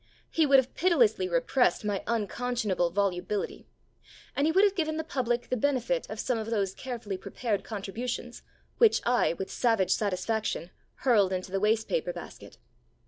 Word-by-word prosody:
He 320 -2 +3
would 275 -1 +7
have 260 -1 +1
pitilessly 370 +2 +3
repressed 280 - +2
my 205 -2 -1
unconscionable 225 -4 0
volubility. 195 +1 -2 0.7
And 285 +2 +2
he - - +3
would 380 +4 +4
have 405 -2 +4
given 315 -4 -1
the 320 - -2
public 245 -5 -2
the - - +1
benefit 285 - 0
of - - -6
some 245 -3 0
of 220 0 -4
those 200 -4 0
carefully 235 -6 -5
prepared 205 +1 -3
contributions 235 +4 -5 0.4
which 460 -3 +5
I, 245 -7 +3
with 190 +2 -6
savage 225 -6 +2
satisfaction, 205 -2 -1 0.3
hurled 210 -7 +4
into 185 0 -3
the 195 - 0
waste 220 +2 +2
paper - - -1
basket. - - -10
235 Hz, 160 wpm, -28 LUFS, 200-280 Hz, 0.7 s, would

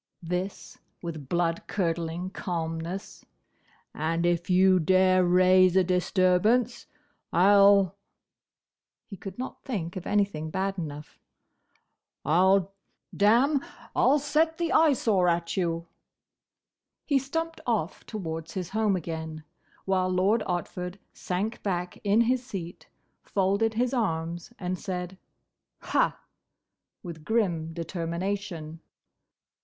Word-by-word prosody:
this 180 +3 -4 0.2
with 155 -5 -6
blood 170 -1 0
curdling 170 -1 -2
calmness. 170 +2 -4 0.7
"And 165 +2 -1
if 175 +1 0
you 185 0 +5
dare 185 +2 +4
raise 185 +1 +5
a 190 - +5
disturbance, 185 +6 +2 0.4
I 190 +4 +5
'll—" 200 -2 +6 1.1
he 200 - -9
could 190 0 -9
not 255 +1 -6
think 190 - -4
of 185 -1 -6
anything 200 -7 0
bad 195 +3 -2
enough. 150 -2 -7 1.1
"I 160 +3 +3
'll—damme! 200 - +2 0.3
I - - +2
'll 280 +3 +5
set 310 +3 +1
the 340 -1 -1
Eyesore 235 - +3
at 170 -1 0
you!" 170 -3 -1 1.2
He 280 -3 +3
stumped 325 +4 -4
off 205 -8 -1
towards 165 -6 -5
his 180 -2 -3
home 215 -1 +1
again, 160 -2 -5 0.4
while 185 -1 +1
Lord 190 +5 +2
Otford 180 +1 -3 0.2
sank 200 +5 -3
back 180 -3 -3
in 205 +2 +4
his 250 +2 +1
seat, 180 -8 -7 0.3
folded 200 +3 0
his 245 +3 0
arms, 170 -6 -2
and 180 -1 -3
said, 185 -1 -5 0.6
"Ha!" - - +1 0.8
with 165 -4 -8
grim 175 -6 0
determination. 170 0 -4
185 Hz, 110 wpm, -27 LUFS, 170-205 Hz, 1.2 s, ll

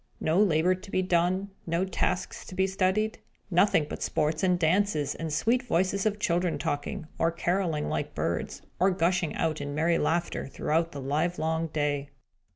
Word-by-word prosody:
No 165 +5 +2
labour 175 -2 +3
to 185 +2 -9
be 185 - +1
done, 185 +2 +1 0.2
no 170 +3 +1
tasks 185 0 -2
to 185 - -8
be 190 - +3
studied; 195 +3 0 0.3
nothing 175 -3 +4
but - - -7
sports 155 +1 0
and 180 -1 +3
dances, 170 -3 +1
and 160 -1 -5
sweet 230 +11 +2
voices 195 -3 +1
of 210 -1 -1
children 175 -3 0
talking, 145 +2 -3
or 165 - +3
carolling 170 -2 0
like - - -3
birds, - - -2 0.2
or 190 - +5
gushing 180 -2 +1
out 155 -2 -1
in 145 0 -4
merry 165 +2 +2
laughter, 170 0 0
throughout 165 +4 0
the 145 - -7
livelong 160 +3 0
day. 145 -2 -1
170 Hz, 165 wpm, -28 LUFS, 155-190 Hz, 0.3 s, or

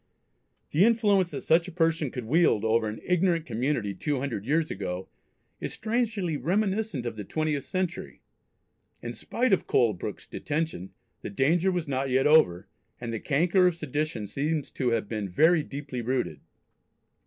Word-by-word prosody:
The 160 +6 +4
influence 205 -5 +3
that - - -6
such 170 +2 +3
a - - -7
person 165 -3 +1
could 125 -1 -6
wield 130 -5 +3
over 110 0 +2
an 105 +1 -5
ignorant 175 -2 +1
community 120 -4 -1
two 145 +9 -2
hundred 120 -6 -4
years 155 +2 +1
ago 95 -1 -4 0.5
is - - -4
strangely 215 -8 -1
reminiscent 190 - -1
of 120 -2 -4
the 105 - -4
twentieth 155 +3 -2
century! 185 -1 -4 0.8
In - - -4
spite 245 -2 0
of 190 - +1
Colebrooke's 110 -7 0
detention, 150 - -3 0.3
the - - -5
danger 160 - +2
was 175 -4 -2
not 135 0 -1
yet 130 +1 +2
over, 125 - +4 0.3
and 120 -1 -5
the 115 - -2
canker 175 - +3
of 180 - +1
sedition 150 -7 -3
seems 145 +6 -2
to 130 -3 -1
have 115 -3 0
been 105 -3 -3
very 160 - +4
deep 140 0 -8
rooted. 125 +1 -2
150 Hz, 160 wpm, -27 LUFS, 120-175 Hz, 0.8 s, The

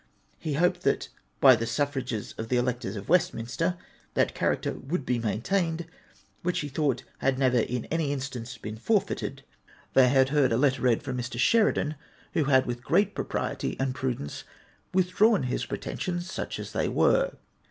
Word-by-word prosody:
He 155 - -3
hoped 175 +4 +2
that - - 0 0.3
by - - +8
the 115 - -3
suffrages 125 -3 -2
of 110 0 -4
the 125 - +2
electors 120 -4 -1
of 100 -1 -7
Westminster, 165 +1 +1 0.4
that - - +2
character - - 0
would 145 0 -4
be 125 -1 0
maintained 165 - -1 0.6
which 180 +1 0
he 145 - -4
thought 140 -3 0 0.2
had 135 -1 +1
never 130 -2 +3
in 120 +1 -1
any 160 -3 0
instance 125 -3 -5
been 110 0 -7
forfeited. 205 - -1 0.5
They 130 -1 +6
had 135 0 +4
heard 140 -4 +3
a 115 - +3
letter 135 0 +2
read 125 -3 +2
from 125 -1 -3
Mr. 120 0 -4
Sheridan, 155 - +3 0.4
who 155 - +2
had 130 -2 +4
with 120 0 -4
great 205 +9 +2
propriety - - -3
and 135 -1 0
prudence 125 - -3 0.5
withdrawn 190 - +3
his 125 -1 -2
pretensions, 175 +7 -4
such - - -4
as - - -6
they - - 0
were. - - +3
130 Hz, 165 wpm, -27 LUFS, 120-165 Hz, 0.6 s, by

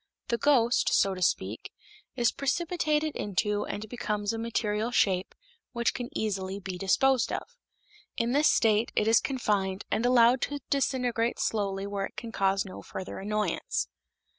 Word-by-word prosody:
The 235 - 0
ghost, 250 -4 +3
so 195 - +3
to 185 - -7
speak, 175 - -1 0.4
is 240 -3 +2
precipitated 310 0 0
into 205 +1 -1
and 215 +1 -5
becomes 210 -2 -2
a 225 - -3
material 225 -1 -1
shape 190 -6 +1 0.4
which 235 -1 +1
can 245 -1 -5
easily 195 -2 -2
be 185 -2 -6
disposed 255 +7 +2
of. 480 - -5 0.6
In 235 +1 0
this 290 +3 +4
state 220 0 +3
it 210 - +2
is 225 - +6
confined 205 -7 -1
and 225 - +1
allowed 245 0 +5
to 290 - -2
disintegrate 250 -4 0
slowly 200 -2 -1
where 200 -1 -2
it - - -23
can 230 - -6
cause 195 -1 +1
no 185 - -9
further 190 0 -7
annoyance. 210 +2 -1
225 Hz, 155 wpm, -28 LUFS, 200-245 Hz, 0.6 s, is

